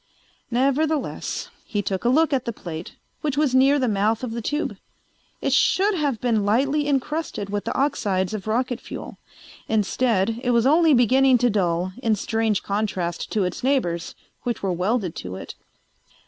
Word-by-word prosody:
Nevertheless 275 +5 0
he 205 -2 -2
took 190 -2 -2
a 240 - +3
look 310 +4 +3
at 265 - 0
the 235 - -1
plate, 170 -5 -8 0.3
which 290 -2 -2
was 295 -4 +2
near 270 +2 +5
the 260 -3 +1
mouth 215 +2 +1
of 245 - -3
the 235 +1 -4
tube. 295 +8 -2 0.6
It - - 0
should 405 +3 +3
have 290 - -1
been 230 -4 +1
lightly 275 +8 +1
encrusted 285 -7 -2
with 205 0 -2
the - - -2
oxides 200 -9 0
of 215 -1 -5
rocket 245 +2 -1
fuel. - - -8 0.5
Instead, 220 0 +1
it 250 - 0
was 235 -1 +3
only 315 +1 +5
beginning 255 +2 +5
to 245 0 +2
dull, 180 -2 0
in 225 -4 +2
strange 220 0 0
contrast 195 -4 -2
to 210 - +2
its 180 +4 -3
neighbors 175 -12 0 0.3
which 240 -4 -3
were 190 -2 0
welded 185 0 -1
to 90 0 -6
it. - - -8
235 Hz, 170 wpm, -23 LUFS, 200-270 Hz, 0.6 s, near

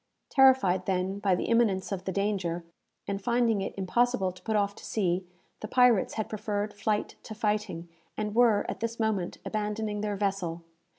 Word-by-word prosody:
Terrified, 255 -10 +5
then, 190 +1 0
by 195 -3 +2
the - - -2
imminence 220 -5 +2
of 190 -1 -4
the 190 - -1
danger, 190 -4 -1 0.4
and 200 0 -2
finding 235 -2 +2
it 195 - -4
impossible 195 +1 +1
to 180 0 -16
put 220 +4 -2
off 200 -1 +1
to - - -12
sea, 185 -3 0 0.4
the 215 - -5
pirates 245 -4 +4
had 215 - -2
preferred 210 -1 -3
flight 210 +1 -2
to 215 - -9
fighting, 210 -5 -1 0.3
and 210 -1 -2
were, 230 -3 +4
at - - -4
this 230 +1 -3
moment, 210 -5 -1
abandoning 210 0 -2
their 210 -1 -1
vessel. 190 -4 -2
205 Hz, 175 wpm, -28 LUFS, 190-220 Hz, 0.4 s, Terrified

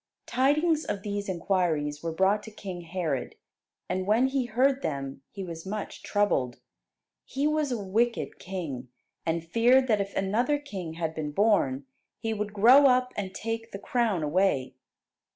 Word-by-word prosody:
Tidings 300 +6 +2
of 200 - -4
these 205 -1 -3
inquiries 165 -5 0
were 165 - -2
brought 190 +5 +2
to - - -10
King 190 -4 -7
Herod, 165 -5 -3 0.5
and 185 0 -2
when 235 +5 +4
he 265 -2 0
heard 260 +4 +2
them 135 - -4
he 195 - -7
was 165 -2 -7
much 205 +2 -5
troubled. 140 - 0 0.6
He 275 +2 -2
was 305 -2 +1
a 245 - 0
wicked 225 +4 -1
king; 160 -10 -5 0.4
and 165 0 0
feared 240 +7 +4
that 210 -2 +3
if 200 0 -5
another 230 +9 +1
king 195 - -6
had 160 -1 -3
been 155 -2 -4
born, 145 -8 +2 0.3
he 225 0 -2
would 210 -1 -3
grow 245 +8 +7
up 250 -1 +3
and 195 -2 -3
take 225 +1 -4
the 195 - -6
crown 215 -5 0
away. 150 -4 +1
200 Hz, 160 wpm, -28 LUFS, 165-240 Hz, 0.6 s, grow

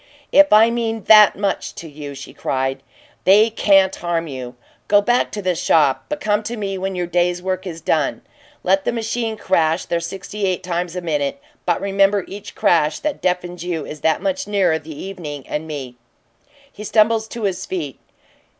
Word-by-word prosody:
"If 295 0 +6
I 220 +2 +6
mean 225 -2 -2
THAT 215 -2 +7
much 200 -1 -2
to 165 - -8
you," 145 -2 -8
she 135 - -10
cried, 135 0 -2 0.4
"they 210 +4 +5
can't 195 -3 +4
harm 170 -1 -1
you! 130 -4 -7 0.3
Go 205 - +5
back 240 +4 +1
to 205 - -4
the 185 -1 +1
shop 150 -4 +2
but 300 0 -3
come 210 -5 +1
to 230 +2 -5
me 200 -2 -3
when 190 0 -3
your 180 -1 -1
day's 175 +1 +1
work 185 +1 -3
is 165 -2 -7
done. 155 -3 0 0.4
Let 190 +1 +2
the - - 0
machines 225 -1 -3
crash 165 -1 +1
their 170 - -1
sixty 195 +4 -5
eight 185 0 -1
times 175 -1 -3
a 180 - -3
minute, 145 -4 -2 0.3
but 175 - +2
remember 195 0 +2
each 205 +1 -9
crash 160 -7 +2
that 300 -1 -3
deafens 180 -1 -2
you 170 -4 -3
is 150 -1 -9
that 160 0 +1
much 285 -1 -1
nearer 190 -6 +2
the 155 -1 -10
evening 155 -8 -7
and 150 +2 -4
me!" 135 -5 -6 0.7
He 210 - -10
stumbled 220 +1 +2
to 235 - -6
his 190 0 -2
feet. 155 -8 -4
185 Hz, 185 wpm, -20 LUFS, 160-210 Hz, 0.7 s, THAT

